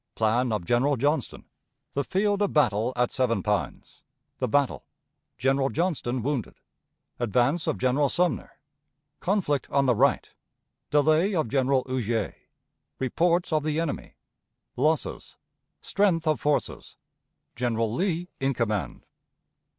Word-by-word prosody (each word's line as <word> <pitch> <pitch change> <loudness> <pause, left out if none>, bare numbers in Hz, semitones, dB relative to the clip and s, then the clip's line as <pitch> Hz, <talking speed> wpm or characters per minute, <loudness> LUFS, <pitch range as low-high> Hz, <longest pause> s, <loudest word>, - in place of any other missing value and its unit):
Plan 115 +3 +1
of 105 -5 -2
General 130 +7 +2
Johnston. 145 +2 -1 0.5
The 140 - 0
Field 200 - 0
of 205 - +1
Battle 120 -5 +2
at 125 0 +1
Seven 115 -6 0
Pines. 105 -1 -3 0.4
The 130 - 0
Battle. 140 +3 +1 0.5
General 135 +2 +1
Johnston 140 -8 -1
wounded. 135 -4 -2 0.6
Advance 125 - +1
of 160 - 0
General 135 +3 +2
Sumner. 180 +2 0 0.7
Conflict 175 -8 0
on 140 0 +2
the 125 - +4
Right. 105 - +2 0.6
Delay 155 +7 +3
of 155 -9 0
General 135 0 +2
Huger. 115 -4 -1 0.6
Reports 170 +6 +1
of 155 -1 +2
the 155 0 0
Enemy. 165 - -4 0.6
Losses. - - -1 0.5
Strength 180 -5 +1
of 155 - +2
Forces. 150 0 -2 0.6
General 115 -2 -1
Lee 175 +2 -1
in 135 0 0
Command. 105 - -2
135 Hz, 120 wpm, -26 LUFS, 120-160 Hz, 0.7 s, the